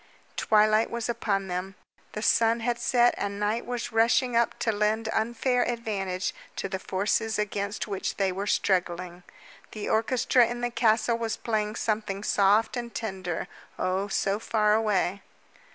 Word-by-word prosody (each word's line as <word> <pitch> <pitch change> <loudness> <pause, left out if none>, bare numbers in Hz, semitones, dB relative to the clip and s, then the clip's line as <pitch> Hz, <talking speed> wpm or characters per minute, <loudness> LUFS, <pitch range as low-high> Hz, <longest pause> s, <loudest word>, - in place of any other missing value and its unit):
Twilight 215 +1 +3
was 235 -1 -3
upon 205 -4 -1
them; 185 +2 -4 0.4
the 215 - -4
sun 230 0 +3
had 235 0 -1
set 245 -1 +3
and 200 0 -3
night 210 +3 -1
was 245 -1 -3
rushing 235 +2 +3
up 235 0 +2
to 225 - 0
lend 215 +1 0
unfair 240 +3 0
advantage 195 -6 -2 0.2
to - - -3
the 190 -1 -4
forces 205 +4 -1
against 205 0 -2
which 195 -2 -3
they 195 -2 +1
were 195 +3 -4
struggling. 180 -2 0 0.5
The 215 - -4
orchestra 240 +2 +3
in 240 +1 -5
the 240 0 -1
castle 230 0 +2
was 225 -1 -2
playing 215 -2 -1
something 210 -3 -2
soft 205 +3 +3
and 240 -1 -4
tender 190 -6 -4 0.3
oh, 185 +2 -1
so 195 +1 0
far 210 -2 +2
away. 205 -3 +1
215 Hz, 150 wpm, -27 LUFS, 195-230 Hz, 0.5 s, Twilight